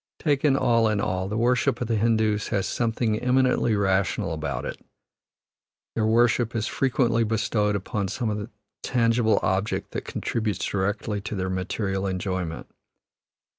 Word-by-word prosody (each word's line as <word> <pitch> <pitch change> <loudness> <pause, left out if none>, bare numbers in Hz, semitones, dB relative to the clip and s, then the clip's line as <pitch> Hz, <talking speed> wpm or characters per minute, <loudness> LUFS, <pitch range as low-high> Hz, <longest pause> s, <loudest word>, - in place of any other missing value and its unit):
Taken 145 -2 +2
all 115 -4 +3
in 105 -1 0
all, 95 -2 -1
the 105 +2 -3
worship 120 0 +2
of 120 - -2
the 115 - +1
Hindoos 110 -1 +1
has 100 -2 0
something 115 -2 0
eminently 125 -2 +2
rational 100 -2 +1
about 70 -5 -3
it; - - -6 1.1
their 110 -1 0
worship 120 +1 +3
is 110 -1 0
frequently 120 -3 +1
bestowed 105 -1 0
upon 100 0 -2
some 105 0 -3 0.3
tangible 115 -2 +2
object 95 +3 -1
that - - -4
contributes 110 -5 -2
directly 100 +1 -1
to 105 +1 -5
their 95 -1 -2
material 95 +1 -2
enjoyment. 90 -3 -3
110 Hz, 135 wpm, -25 LUFS, 100-115 Hz, 1.1 s, all